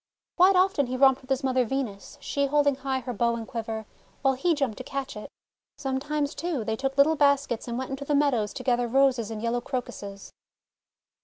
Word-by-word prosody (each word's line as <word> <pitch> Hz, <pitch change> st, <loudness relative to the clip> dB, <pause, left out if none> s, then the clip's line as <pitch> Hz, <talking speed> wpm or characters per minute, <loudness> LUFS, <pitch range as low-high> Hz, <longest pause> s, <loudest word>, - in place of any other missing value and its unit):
Quite 375 Hz, +2 st, +6 dB
often 365 Hz, -7 st, +3 dB
he 255 Hz, +1 st, -3 dB
romped 265 Hz, 0 st, +5 dB
with 260 Hz, -, -19 dB
his 270 Hz, +1 st, 0 dB
mother 260 Hz, -1 st, +2 dB
Venus, 235 Hz, -5 st, -4 dB
she 280 Hz, 0 st, -1 dB
holding 285 Hz, 0 st, +3 dB
high 265 Hz, -1 st, -2 dB
her 245 Hz, 0 st, -5 dB
bow 235 Hz, +2 st, +1 dB
and 225 Hz, -1 st, -6 dB
quiver, 225 Hz, -1 st, -4 dB, 0.4 s
while 270 Hz, -1 st, +4 dB
he 325 Hz, +6 st, +1 dB
jumped 270 Hz, -6 st, -2 dB
to -, -, -5 dB
catch 275 Hz, +1 st, -5 dB
it. 210 Hz, -, -8 dB, 0.5 s
Sometimes, 285 Hz, +2 st, -2 dB
too, 310 Hz, -5 st, -2 dB
they 220 Hz, -, -1 dB
took 270 Hz, +3 st, -3 dB
little 300 Hz, +3 st, +5 dB
baskets 280 Hz, -5 st, +2 dB
and 235 Hz, 0 st, -3 dB
went 260 Hz, +1 st, -4 dB
into 270 Hz, +1 st, -5 dB
the 290 Hz, -, +1 dB
meadows 255 Hz, -8 st, +2 dB
to -, -, -6 dB
gather 245 Hz, -2 st, +1 dB
Roses 255 Hz, -3 st, +2 dB
and 220 Hz, 0 st, -6 dB
yellow 235 Hz, +1 st, 0 dB
Crocuses. 205 Hz, -6 st, -6 dB
265 Hz, 205 wpm, -26 LUFS, 235-280 Hz, 0.5 s, Quite